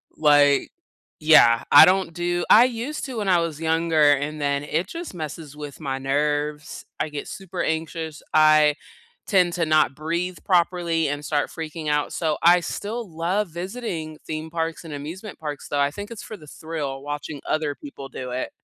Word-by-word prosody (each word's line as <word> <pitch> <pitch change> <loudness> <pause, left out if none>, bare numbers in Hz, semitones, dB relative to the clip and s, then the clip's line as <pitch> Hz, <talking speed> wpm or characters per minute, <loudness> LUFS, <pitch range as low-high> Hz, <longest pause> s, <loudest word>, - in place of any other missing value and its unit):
Like 145 -2 +4 0.5
yeah, 120 -7 +6
I 145 - +11
don't 185 -2 +1
do 175 0 -1
I 235 +3 +8
used 255 +5 -4
to 255 -4 -6
when 205 -2 -2
I 175 -2 +5
was 165 -2 -3
younger, 160 -2 +3
and 145 +2 -3
then 140 0 0
it 165 +5 -1
just 335 - -7
messes 155 -2 -7
with 145 0 -8
my 135 -3 -3
nerves, 150 +2 -2
I 155 - -1
get 150 -1 -6
super 190 -2 -6
anxious, 160 -1 -3
I 155 -1 +5 0.5
tend 180 -3 +3
to 170 -2 0
not 155 -3 +3
breathe 170 +3 -3
properly 170 -3 +1
and 145 +1 -3
start 145 -1 0
freaking 160 -1 -6
out, 150 0 0
so, 160 -3 -1
I 175 +1 +7
still 210 +5 -5
love 175 +6 -1
visiting 170 -3 -5
theme 155 0 -5
parks 165 0 -3
and 160 -3 -8
amusement 165 +9 -7
parks, 150 -3 -6
though, 145 - -1
I 140 0 +2
think 205 +6 -8
it's 230 - -7
for 215 - -8
the 155 - -15
thrill, 145 -4 -5
watching 145 0 -6
other 155 -2 0
people 140 - -10
do 125 -1 -7
it. 125 - -3
160 Hz, 180 wpm, -23 LUFS, 150-175 Hz, 0.5 s, I